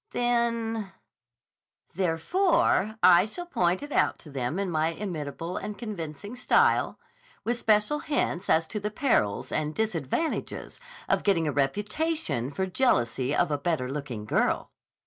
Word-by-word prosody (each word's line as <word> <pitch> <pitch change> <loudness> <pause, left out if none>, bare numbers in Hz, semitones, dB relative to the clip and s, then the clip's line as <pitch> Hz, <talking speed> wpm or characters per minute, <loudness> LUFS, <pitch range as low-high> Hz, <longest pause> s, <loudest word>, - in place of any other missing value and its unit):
"Then—" 230 -3 0 1.0
"Therefore 215 - +2
I 180 +2 +7
shall 350 +11 -6
point 180 - 0
it 290 - -8
out - - +2
to 150 - -11
them 130 +3 -2
in 195 -2 -1
my 155 0 +1
inimitable 165 -2 -4
and 210 -1 -5
convincing 205 - -6
style, 250 - +3 0.5
with 240 +1 -1
special 215 +7 +2
hints 285 - -1
as 165 +1 +4
to 210 - -3
the 210 +1 -2
perils 210 - 0
and 155 0 -1
disadvantages 220 - -2 0.3
of - - +2
getting 170 -6 +2
a - - +1
reputation 205 - -1
for 190 +6 -2
jealousy 135 - +1
of 175 - +2
a 145 - 0
better 140 -5 -1
looking 135 -7 -5
girl!" - - 0
185 Hz, 140 wpm, -27 LUFS, 150-230 Hz, 1.0 s, I